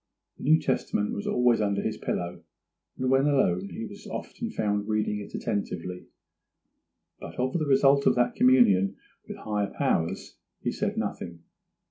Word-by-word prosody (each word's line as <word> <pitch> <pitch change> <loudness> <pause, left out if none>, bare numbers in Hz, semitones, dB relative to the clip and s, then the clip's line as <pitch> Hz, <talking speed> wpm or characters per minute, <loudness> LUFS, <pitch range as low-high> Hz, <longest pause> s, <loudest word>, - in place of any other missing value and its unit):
The - - -8
New 155 +3 +6
Testament 130 -7 -1
was 100 - -4
always 125 -2 +3
under 100 -1 0
his 110 - -1
pillow, 85 0 -3 0.6
and 130 0 0
when 135 +2 +4
alone 100 -10 +2
he 115 - -6
was 100 - -11
often - - -5
found 105 -1 -1
reading 105 -1 0
it 100 - -8
attentively, 90 -3 -3 1.1
but - - -9
of 130 +1 -1
the 155 -4 0
result 140 0 +4
of - - +5
that 120 0 +2
communion 100 -7 +4 0.3
with - - -7
higher 105 -2 -2
powers 80 0 -1 0.2
he - - -2
said - - -2
nothing. 85 -1 -4
105 Hz, 155 wpm, -27 LUFS, 100-130 Hz, 1.1 s, New